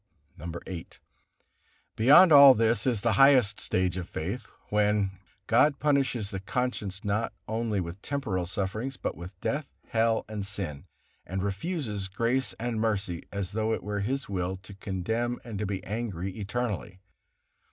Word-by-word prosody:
VIII. 85 +2 -7 1.1
Beyond 150 +10 +7
all 140 -2 +10
this 115 +3 +2
is 120 -5 +1
the 120 0 +2
highest 130 -7 +6
stage 90 -1 0
of 90 - -5
faith, 100 +7 -4 0.2
when; 105 -1 +2 0.3
God 140 +7 +4
punishes 135 -8 +1
the 95 - -3
conscience 105 -1 -3
not 105 +3 0
only 110 -2 -1
with 90 +2 -5
temporal 100 -11 -2
sufferings, 110 +8 -3
but - - -3
with 90 +2 -10
death, 140 0 -1 0.2
hell, 115 0 +2
and 105 -2 -4
sin, 95 -8 -5 0.4
and 95 +1 -4
refuses 105 - -3
grace 115 +7 0
and 115 -1 -2
mercy, 100 -6 -1
as 100 -2 -3
though 110 +1 0
it - - -3
were 105 0 -2
His 130 +6 -2
will 95 -1 -2
to 100 - -10
condemn 110 +5 -2
and 110 -5 -6
to 105 - -1
be 95 -2 -3
angry 100 -3 -3
eternally. 105 -1 -4
105 Hz, 150 wpm, -28 LUFS, 95-120 Hz, 1.1 s, all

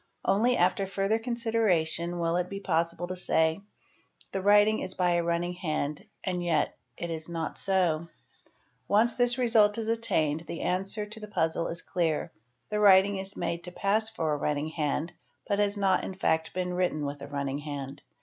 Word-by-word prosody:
Only 240 +5 +3
after 185 +2 +2
further 195 +3 0
consideration 210 -8 0
will 170 0 0
it 180 0 -1
be 200 - -5
qi - - -18
possible 170 0 0
to 185 +1 -5
say 160 -1 +1 0.7
"The 195 - -2
writing 205 +2 +5
is 185 0 -5
by 180 -1 +2
a 175 0 +2
running 170 +1 -1
hand—and 175 +2 -3
yet 165 -4 +1 0.2
it 170 -1 -4
is 160 0 -4
not 165 -1 -4
so"'; 175 -4 +1 0.4
| - - -36 0.3
once 220 +3 +3
this 245 0 +3
result 225 -4 +4
is 225 -1 -3
attained 160 -10 +1
the 170 - -5
answer 195 +4 -1
to 215 +2 -9
the 210 - -8
puzzle 165 -4 0
is 170 - -6
clear 165 -4 -1 0.4
;—the 210 - -1
writing 200 -1 +6
1s 190 +1 -6
made 170 0 -2
to 180 - -7
pass 210 +4 +1
for 160 -9 -1
a - - 0
running 150 +1 -1
hand 155 +1 -2 0.3
but 200 0 0
has 205 0 +1
not 195 -2 +2
in 190 - -5
'fact 160 -4 0
been 180 -1 -1
written 180 -5 0
with 140 0 -5
a 140 - -7
running 140 -1 -3
hand. 145 -1 -6
180 Hz, 190 wpm, -28 LUFS, 160-205 Hz, 0.7 s, writing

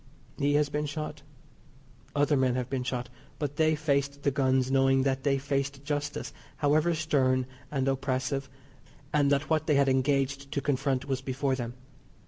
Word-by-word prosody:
He 145 +1 +2
has 150 0 +3
been 150 +1 -2
shot. 150 0 -5 0.9
Other 145 +1 +3
men 130 -2 +2
have 125 0 -3
been 135 -2 0
shot, 125 -1 -3 0.3
but 145 -2 -3
they 155 0 +3
faced 140 -2 0
the 140 - +3
guns 130 -1 +2
knowing 135 0 +4
that 135 -1 0
they 135 0 +2
faced 140 0 -2
justice, 145 0 -3 0.2
however 155 +3 +3
stern 130 -5 +2 0.2
and 135 -2 -1
oppressive; 135 0 -1 0.6
and 145 -2 +3
that 140 +1 +2
what 155 -1 +2
they 150 - +4
had 140 0 +4
engaged 135 +1 +1
to 140 - 0
confront 135 -1 0
was 135 -2 -2
before 135 +1 -1
them. 120 -2 -4
140 Hz, 165 wpm, -29 LUFS, 130-145 Hz, 0.9 s, knowing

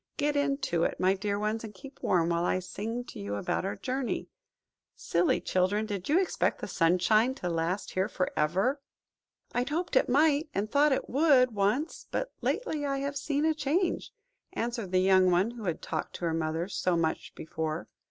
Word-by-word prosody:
Get 295 0 +1
into 275 - 0
it, - - -1
my 185 +1 +4
dear 200 +1 -2
ones, 215 +2 -1
and 210 -2 -8
keep 270 +8 -12
warm, 170 -2 +2
while 170 0 +1
I 180 - +1
sing 215 +6 -4
to - - -10
you 100 0 -4
about 100 - -1
our 195 - -2
journey. 260 0 -3 0.7
Silly 170 +1 +1
children, 185 +4 +1
did 200 -1 -5
you 320 +5 +5
expect 380 - 0
the - - -5
sunshine 200 +9 +3
to 180 - -4
last 170 +4 -1
here 190 +3 0
for 185 - -1
ever?" 195 - +1 0.7
"I 245 - +1
hoped 335 +4 -2
it - - +4
might, 295 +3 +3
and 210 +2 -1
thought 290 +1 +4
it 265 - 0
would, 270 -3 +4
once, 210 - -1
but - - -2
lately 315 -12 -1
I 275 -1 0
have 280 +1 -3
seen 290 +1 0
a 320 - +3
change," 310 +5 -1 0.4
answered 230 -5 -3
the 185 - +3
young 185 -1 +5
one 180 +6 +2
who 235 -3 -8
had 170 -3 -2
talked 155 - -4
to 175 - -4
her 165 - 0
mother 160 +1 -1
so 180 -3 0
much 160 -1 -2
before. 160 0 -4
210 Hz, 190 wpm, -29 LUFS, 180-280 Hz, 0.7 s, you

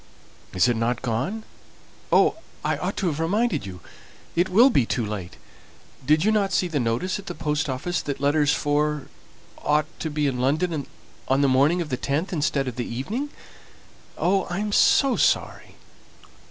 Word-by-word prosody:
"Isn't 115 +4 +2
it 120 +1 0
gone? 135 - -2 0.7
Oh, - - +4 0.3
I - - +1
ought - - -3
to 195 - -1
have 160 -4 -1
reminded 195 - 0
you! 90 -2 -9 0.5
It 175 +2 +2
will 235 +9 +6
be 135 - +3
too 115 0 -2
late. 100 -4 -6 0.7
Did 155 +4 +3
you 215 - +4
not 200 -3 +1
see 185 - +1
the 160 -4 -1
notice 120 - -1
at 195 - -12
the 175 - -5
post 150 -2 -1
office 140 +7 -2
that 140 -2 -4
letters 145 +1 +2 0.9
ought 150 0 +1
to 160 - -3
be 150 0 -1
in 130 -3 -1
London 150 +3 0 0.4
on 135 +1 +2
the 140 - +4
morning 140 +7 +3
of 155 - -11
the 130 - -1
10th 155 +8 -2
instead 145 -4 0
of 125 - -5
the 120 - -3
evening. 225 - -3 0.9
Oh, 195 +2 +1
I 175 - -4
am 210 +1 -2
so 270 +5 +4
sorry!" - - 0
150 Hz, 170 wpm, -24 LUFS, 130-185 Hz, 0.9 s, will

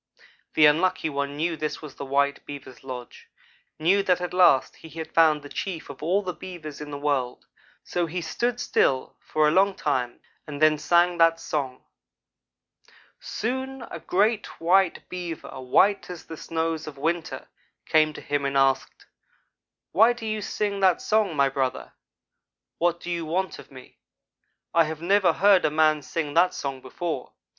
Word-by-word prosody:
The 155 - +7
Unlucky 165 +2 +2
one 140 0 -3
knew 165 +2 0
this 155 -1 -4
was 150 -4 -10
the 140 - -7
white 140 +1 0
Beaver's 140 -3 -10
lodge 125 -2 -9 0.5
knew 180 +6 +3
that 185 -2 +2
at 180 0 -4
last 175 -8 +4
he 160 - -13
had 160 +1 -8
found 155 -3 +4
the - - -8
chief 165 -1 -5
of 135 - -13
all 190 +6 +1
the 180 -1 -3
Beavers 160 -6 -9
in 150 - -7
the 145 - -5
world; 140 -4 -2 0.4
so 175 -1 -2
he 175 +3 -3
stood 240 +9 -2
still 130 - +1
for 155 -1 +1
a - - +3
long 195 +3 +3
time, 125 -5 -2 0.3
and 145 -1 -6
then 155 -1 +4
sang 175 +3 +3
that 165 0 +5
song. 135 -6 -4 1.4
"Soon 260 +3 -4
a - - -6
great 210 +3 +1
white 180 +2 +2
Beaver 170 -7 -6
white 195 +12 +2
as 180 -2 -8
the 165 - -8
snows 160 0 -3
of 145 -2 -8
winter 165 +3 -2 0.4
came 155 -1 +3
to - - -9
him 145 -1 -2
and 140 0 0
asked: 135 -1 +1 0.9
'Why 225 +5 +5
do 240 -2 -9
you 215 -1 -2
sing 205 -1 -2
that 190 -2 +4
song, 210 -6 +1
my 140 -1 +4
brother? 135 -1 -2 0.9
What 170 0 +1
do 175 - -5
you 170 -1 -2
want 180 +4 -2
of - - -13
me? 130 -2 -14 0.7
I 165 -1 +5
have 155 0 -5
never 190 -1 +4
heard 195 +2 +4
a - - +3
man 155 0 +3
sing 150 0 -4
that 180 +3 +3
song 135 -2 -4
before. 135 +1 -5
160 Hz, 170 wpm, -25 LUFS, 145-185 Hz, 1.4 s, The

